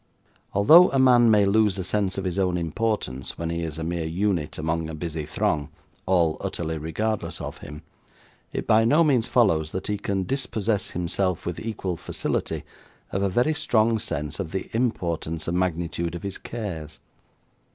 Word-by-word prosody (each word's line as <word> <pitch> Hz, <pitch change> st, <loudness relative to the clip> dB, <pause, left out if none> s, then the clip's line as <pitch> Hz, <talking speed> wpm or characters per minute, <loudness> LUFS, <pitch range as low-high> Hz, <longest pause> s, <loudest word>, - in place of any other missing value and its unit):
Although 160 Hz, -, +8 dB
a 135 Hz, -, 0 dB
man 125 Hz, -3 st, +6 dB
may 105 Hz, -2 st, +5 dB
lose 105 Hz, -1 st, +3 dB
a 95 Hz, -, -2 dB
sense 100 Hz, +1 st, -1 dB
of 95 Hz, -, -2 dB
his 95 Hz, 0 st, -2 dB
own 90 Hz, -2 st, +1 dB
importance 85 Hz, -, -2 dB
when 85 Hz, 0 st, -3 dB
he 85 Hz, 0 st, -2 dB
is 80 Hz, -2 st, -4 dB
a 80 Hz, -, -4 dB
mere 85 Hz, -1 st, -2 dB
unit 85 Hz, -2 st, -1 dB
among 80 Hz, +1 st, -1 dB
a 80 Hz, -, -5 dB
busy 80 Hz, -2 st, -4 dB
throng, 75 Hz, -1 st, 0 dB, 0.4 s
all 85 Hz, -4 st, +3 dB
utterly 80 Hz, -1 st, -3 dB
regardless 105 Hz, +8 st, -2 dB
of -, -, -6 dB
him, 75 Hz, +2 st, -9 dB, 0.7 s
it -, -, -3 dB
by 110 Hz, +1 st, +5 dB
no 150 Hz, +9 st, +5 dB
means 130 Hz, -7 st, +2 dB
follows 80 Hz, -10 st, +2 dB
that 95 Hz, -, -3 dB
he 105 Hz, -1 st, -2 dB
can 100 Hz, -1 st, -1 dB
dispossess 110 Hz, -4 st, -1 dB
himself, 90 Hz, +1 st, -1 dB
with 85 Hz, -1 st, -3 dB
equal 95 Hz, -6 st, -3 dB
facility, -, -, -3 dB, 0.5 s
of 95 Hz, -, -1 dB
a 100 Hz, -, +2 dB
very 120 Hz, +11 st, +2 dB
strong 115 Hz, -5 st, +2 dB
sense 75 Hz, -5 st, -4 dB
of 90 Hz, -5 st, -4 dB
the 95 Hz, -, -4 dB
importance 85 Hz, -9 st, -1 dB
and 85 Hz, +1 st, 0 dB
magnitude 85 Hz, -1 st, -1 dB
of 85 Hz, -, -7 dB
his 100 Hz, -1 st, -5 dB
cares. 85 Hz, -10 st, -6 dB
95 Hz, 175 wpm, -25 LUFS, 80-110 Hz, 0.7 s, Although